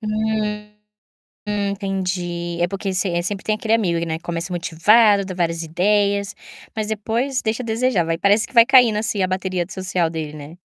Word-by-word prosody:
Hum, 215 Hz, -1 st, -2 dB, 0.8 s
entendi. 190 Hz, -4 st, -2 dB
É, 175 Hz, -, +3 dB
porque 195 Hz, +1 st, -4 dB
sem 185 Hz, -2 st, 0 dB
eh, -, -, +1 dB
sempre 195 Hz, +2 st, -4 dB
tem 215 Hz, -, 0 dB
aquele 220 Hz, +1 st, -1 dB
amigo, 170 Hz, -7 st, +1 dB
né, 160 Hz, 0 st, -3 dB
começa 170 Hz, +1 st, -5 dB
motivado, 200 Hz, +5 st, +4 dB
dá 190 Hz, -, -6 dB
várias 170 Hz, -2 st, -1 dB
ideias, 200 Hz, +4 st, +1 dB, 0.4 s
mas 215 Hz, -1 st, -2 dB
depois 230 Hz, +5 st, -1 dB
deixa 225 Hz, +3 st, -2 dB
a -, -, -7 dB
desejar 230 Hz, -4 st, +1 dB
vai 165 Hz, 0 st, -1 dB
parece 205 Hz, +4 st, +3 dB
que -, -, -19 dB
vai 230 Hz, -1 st, +7 dB
caindo 245 Hz, -5 st, +5 dB
assim 215 Hz, -2 st, -1 dB
a -, -, +1 dB
bateria 185 Hz, -1 st, -2 dB
de -, -, -11 dB
social 185 Hz, -3 st, -1 dB
dele, 155 Hz, -2 st, -5 dB
né. 150 Hz, +3 st, -10 dB
195 Hz, 185 wpm, -21 LUFS, 175-215 Hz, 0.8 s, vai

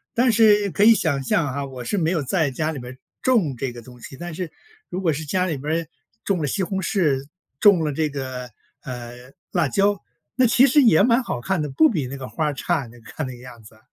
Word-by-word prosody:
但 245 Hz, 0 st, +4 dB
是 210 Hz, -3 st, +4 dB
可 205 Hz, -, +1 dB
以 225 Hz, +1 st, +8 dB
想 145 Hz, -7 st, 0 dB
象 145 Hz, +4 st, +1 dB
啊， 140 Hz, +1 st, -3 dB
我 130 Hz, -2 st, -7 dB
是 200 Hz, -, -1 dB
没 160 Hz, 0 st, +1 dB
有 165 Hz, -5 st, 0 dB
在 155 Hz, +1 st, +1 dB
家 155 Hz, +4 st, -2 dB
里 145 Hz, -, -6 dB
面 125 Hz, 0 st, -8 dB
儿 130 Hz, -, -13 dB, 0.2 s
种 200 Hz, -, +2 dB
这 130 Hz, 0 st, -3 dB
个 120 Hz, -, -10 dB
东 125 Hz, 0 st, -14 dB
西， 135 Hz, -, -10 dB
但 175 Hz, 0 st, -7 dB
是 170 Hz, -1 st, -5 dB, 0.4 s
如 185 Hz, -, -4 dB
果 165 Hz, -5 st, +1 dB
是 155 Hz, +3 st, -5 dB
家 180 Hz, +5 st, 0 dB
里 165 Hz, -5 st, -2 dB
面 145 Hz, +3 st, -4 dB
儿 160 Hz, -, -11 dB, 0.4 s
种 195 Hz, -4 st, 0 dB
了 145 Hz, -, -1 dB
西 190 Hz, +8 st, -1 dB
红 190 Hz, +1 st, -2 dB
柿， 150 Hz, -8 st, 0 dB, 0.3 s
种 195 Hz, -6 st, +5 dB
了 150 Hz, -2 st, -1 dB
这 155 Hz, +1 st, 0 dB
个， 130 Hz, -3 st, -6 dB, 0.3 s
呃， 125 Hz, 0 st, -9 dB, 0.2 s
辣 -, -, +1 dB
椒， 200 Hz, 0 st, +1 dB, 0.3 s
那 255 Hz, -2 st, +4 dB
其 245 Hz, +3 st, +5 dB
实 280 Hz, +2 st, +5 dB
也 200 Hz, -7 st, +5 dB
蛮 240 Hz, +2 st, +4 dB
好 125 Hz, -, -3 dB
看 190 Hz, +4 st, -1 dB
的， 150 Hz, -, -3 dB
不 315 Hz, -, +4 dB
比 155 Hz, -, -2 dB
那 140 Hz, +2 st, -6 dB
个 130 Hz, -1 st, -7 dB
花 155 Hz, -, -2 dB
儿 145 Hz, -2 st, -1 dB
差， 150 Hz, -5 st, -1 dB
你 120 Hz, +1 st, -15 dB
看 145 Hz, +4 st, -6 dB
那 130 Hz, -, -7 dB
个 125 Hz, -, -15 dB
样 120 Hz, -2 st, -12 dB
子。 110 Hz, +1 st, -17 dB
155 Hz, 270 characters per minute, -22 LUFS, 130-195 Hz, 0.4 s, 以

